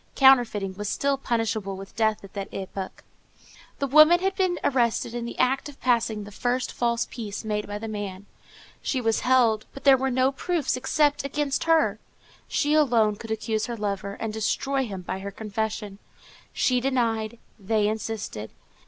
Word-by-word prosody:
Counterfeiting 240 Hz, -8 st, +4 dB
was 205 Hz, -1 st, -3 dB
still 280 Hz, 0 st, +1 dB
punishable 225 Hz, -6 st, -2 dB
with 195 Hz, 0 st, -10 dB
death 220 Hz, -2 st, +1 dB
at 195 Hz, -, -12 dB
that 200 Hz, -1 st, -5 dB
epoch. 190 Hz, 0 st, -6 dB, 0.7 s
The 280 Hz, -, -1 dB
woman 310 Hz, +5 st, +7 dB
had 385 Hz, +1 st, 0 dB
been 370 Hz, -2 st, +1 dB
arrested 235 Hz, -3 st, +1 dB
in 240 Hz, -1 st, -3 dB
the 235 Hz, -, -7 dB
act 265 Hz, +3 st, +1 dB
of 280 Hz, -, -14 dB
passing 230 Hz, -4 st, +1 dB
the 205 Hz, -, -10 dB
first 245 Hz, +4 st, -1 dB
false 235 Hz, -1 st, 0 dB
piece 220 Hz, -3 st, -6 dB
made 210 Hz, -1 st, -2 dB
by 205 Hz, 0 st, -4 dB
the 225 Hz, +2 st, -6 dB
man. 200 Hz, -2 st, -5 dB, 0.6 s
She 265 Hz, -, -1 dB
was 225 Hz, -2 st, +1 dB
held, 240 Hz, -4 st, +3 dB
but 275 Hz, -, -9 dB
there 275 Hz, -1 st, +7 dB
were 265 Hz, +1 st, 0 dB
no 260 Hz, +1 st, +2 dB
proofs 315 Hz, 0 st, -1 dB
except 290 Hz, +3 st, +1 dB
against 280 Hz, +1 st, -1 dB
her. 325 Hz, -1 st, +3 dB, 0.5 s
She 295 Hz, 0 st, +1 dB
alone 235 Hz, -8 st, +4 dB
could 225 Hz, +2 st, -10 dB
accuse 220 Hz, 0 st, -1 dB
her 235 Hz, -1 st, -4 dB
lover, 200 Hz, -1 st, -3 dB
and 225 Hz, -1 st, -3 dB
destroy 265 Hz, +5 st, 0 dB
him 190 Hz, -3 st, -6 dB
by 190 Hz, -, -4 dB
her 200 Hz, +1 st, -5 dB
confession. 210 Hz, -1 st, -4 dB, 0.5 s
She 250 Hz, -1 st, +2 dB
denied; 235 Hz, -4 st, 0 dB, 0.2 s
they 210 Hz, +1 st, +1 dB
insisted. 215 Hz, -, -4 dB
225 Hz, 170 wpm, -25 LUFS, 210-265 Hz, 0.7 s, woman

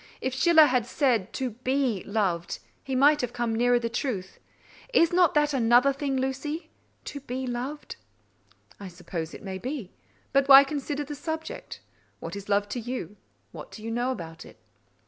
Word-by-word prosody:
If 260 Hz, -, -2 dB
Schiller 315 Hz, +3 st, +6 dB
had 250 Hz, -4 st, +1 dB
said 245 Hz, -8 st, +1 dB
to 260 Hz, -2 st, -2 dB
be 255 Hz, -2 st, -1 dB
loved, 190 Hz, -5 st, -1 dB, 0.3 s
he 265 Hz, -, -3 dB
might 290 Hz, +3 st, +5 dB
have 245 Hz, -1 st, -3 dB
come 240 Hz, -2 st, -1 dB
nearer 245 Hz, +1 st, +3 dB
the 235 Hz, -1 st, -1 dB
truth. 230 Hz, -6 st, -4 dB, 0.6 s
Is 335 Hz, +1 st, +5 dB
not 355 Hz, -3 st, +4 dB
that 295 Hz, 0 st, +3 dB
another 245 Hz, +2 st, +4 dB
thing, 275 Hz, -1 st, -2 dB
Lucy, 270 Hz, +5 st, -3 dB, 0.3 s
to 285 Hz, -, -6 dB
be 260 Hz, -1 st, -5 dB
loved?" 255 Hz, +4 st, -5 dB, 0.8 s
"I 200 Hz, -, -7 dB
suppose 170 Hz, -2 st, -6 dB
it -, -, -11 dB
may 190 Hz, -1 st, -5 dB
be: 250 Hz, -4 st, -5 dB, 0.4 s
but 275 Hz, 0 st, +3 dB
why 275 Hz, 0 st, +10 dB
consider 290 Hz, 0 st, -3 dB
the 290 Hz, +1 st, -7 dB
subject? 320 Hz, -, -6 dB, 0.4 s
What -, -, -6 dB
is 200 Hz, 0 st, -8 dB
love 205 Hz, 0 st, +2 dB
to 245 Hz, -, -3 dB
you? 240 Hz, -3 st, -5 dB, 0.4 s
What -, -, -10 dB
do 215 Hz, -, -11 dB
you 225 Hz, -, -4 dB
know 240 Hz, +2 st, 0 dB
about 165 Hz, -10 st, -6 dB
it?" -, -, -15 dB
255 Hz, 175 wpm, -27 LUFS, 220-280 Hz, 0.8 s, why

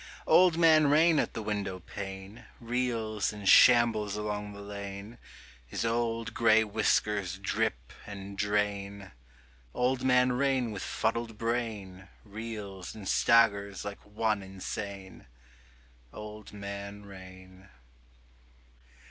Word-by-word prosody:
Old 180 Hz, -2 st, +5 dB
Man 160 Hz, -3 st, +6 dB
Rain 155 Hz, +2 st, +5 dB
at -, -, -2 dB
the 110 Hz, -, -4 dB
windowpane 100 Hz, +1 st, -6 dB
Reels 115 Hz, -3 st, -1 dB
and 105 Hz, -2 st, -7 dB
shambles 115 Hz, -4 st, +6 dB
along 105 Hz, -1 st, -4 dB
the 100 Hz, -, -10 dB
lane: 100 Hz, +2 st, -8 dB, 0.5 s
His 60 Hz, -, -3 dB
old 115 Hz, 0 st, -1 dB
gray 110 Hz, -1 st, +4 dB
whiskers 100 Hz, -3 st, 0 dB
drip 60 Hz, -10 st, -2 dB
and 100 Hz, -1 st, -8 dB
drain: 100 Hz, -1 st, -2 dB, 0.6 s
Old 125 Hz, +1 st, 0 dB
Man 125 Hz, -1 st, +4 dB
Rain 130 Hz, -2 st, +1 dB
with 100 Hz, -3 st, -6 dB
fuddled 115 Hz, 0 st, -2 dB
brain 105 Hz, -5 st, -3 dB, 0.2 s
Reels 105 Hz, -3 st, -7 dB
and 105 Hz, -3 st, -8 dB
staggers 100 Hz, -5 st, +3 dB
like 100 Hz, 0 st, -7 dB
one 105 Hz, 0 st, -1 dB
insane. 95 Hz, -1 st, -7 dB, 0.8 s
Old 105 Hz, 0 st, -9 dB
Man 100 Hz, 0 st, -7 dB
Rain. 95 Hz, -1 st, -13 dB
105 Hz, 105 wpm, -29 LUFS, 100-115 Hz, 0.8 s, Man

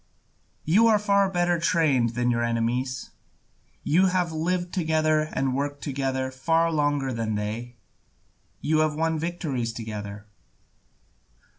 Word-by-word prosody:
You 210 Hz, +9 st, +5 dB
are 220 Hz, -2 st, +5 dB
far 200 Hz, -1 st, +2 dB
better 175 Hz, -2 st, +1 dB
trained 150 Hz, -10 st, +2 dB
than 120 Hz, 0 st, +1 dB
your 120 Hz, 0 st, 0 dB
enemies, 120 Hz, +3 st, -1 dB, 0.7 s
you 185 Hz, +5 st, +3 dB
have 180 Hz, -2 st, 0 dB
lived 175 Hz, +3 st, -2 dB
together 155 Hz, -2 st, +1 dB
and 135 Hz, -1 st, -1 dB
worked 145 Hz, +1 st, -3 dB
together 130 Hz, -2 st, -2 dB
far 165 Hz, +5 st, +1 dB
longer 145 Hz, -3 st, 0 dB
than 115 Hz, -2 st, -2 dB
they, 110 Hz, +4 st, -4 dB, 0.9 s
you 155 Hz, +1 st, +1 dB
have 155 Hz, -1 st, +1 dB
won 160 Hz, 0 st, 0 dB
victories 155 Hz, -8 st, -2 dB
together. 105 Hz, -2 st, -7 dB
145 Hz, 125 wpm, -25 LUFS, 120-165 Hz, 0.9 s, You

